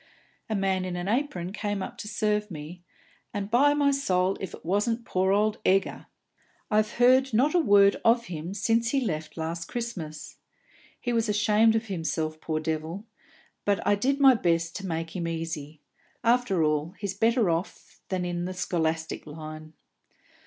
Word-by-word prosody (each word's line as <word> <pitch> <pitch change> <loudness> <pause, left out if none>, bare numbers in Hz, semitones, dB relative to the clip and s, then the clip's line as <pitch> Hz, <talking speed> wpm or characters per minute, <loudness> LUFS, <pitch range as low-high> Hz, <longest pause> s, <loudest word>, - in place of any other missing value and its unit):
A 220 - 0
man 190 -1 0
in 185 -1 -4
an 175 +1 -4
apron 205 -7 -1
came 205 -2 -2
up - - -7
to - - -6
serve 210 -1 0
me, 165 +1 -8 0.5
and, 200 0 -3
by 285 +5 +5
me 285 -1 +3
soul, 190 -9 +1
if 190 - -6
it - - -18
wasn't 225 +6 0
poor 185 +1 +1
old 210 +1 +2
Egger! 190 +1 +1 0.6
I've 215 +1 +2
heard 255 0 +4
not 275 +7 +3
a 355 - +4
word 200 -8 +5
of 235 +1 +4
him 170 +2 -6
since 225 +3 +1
he 275 - +2
left 155 -10 -3
last 165 +1 -3
Christmas. 180 -11 -6 0.6
He 245 - -2
was 230 -1 +1
ashamed 210 +1 +4
of 225 0 0
himself, 160 -4 -3
poor 155 -1 -2
devil; 160 +5 -3 0.6
but 205 -1 +1
I - - +4
did 265 +8 +1
my 270 -2 +8
best 170 -6 0
to 195 -1 -6
make 165 0 -4
him 170 -2 -2
easy. 160 -2 -5 0.4
After 230 -7 +2
all, 155 +3 0
he's 200 -2 -3
better 225 -1 +2
off 165 +3 -5
than 185 -2 -1
in 175 0 -2
the 185 0 -5
scholastic 160 -4 -2
line." 155 +1 -9
195 Hz, 170 wpm, -27 LUFS, 165-225 Hz, 0.6 s, my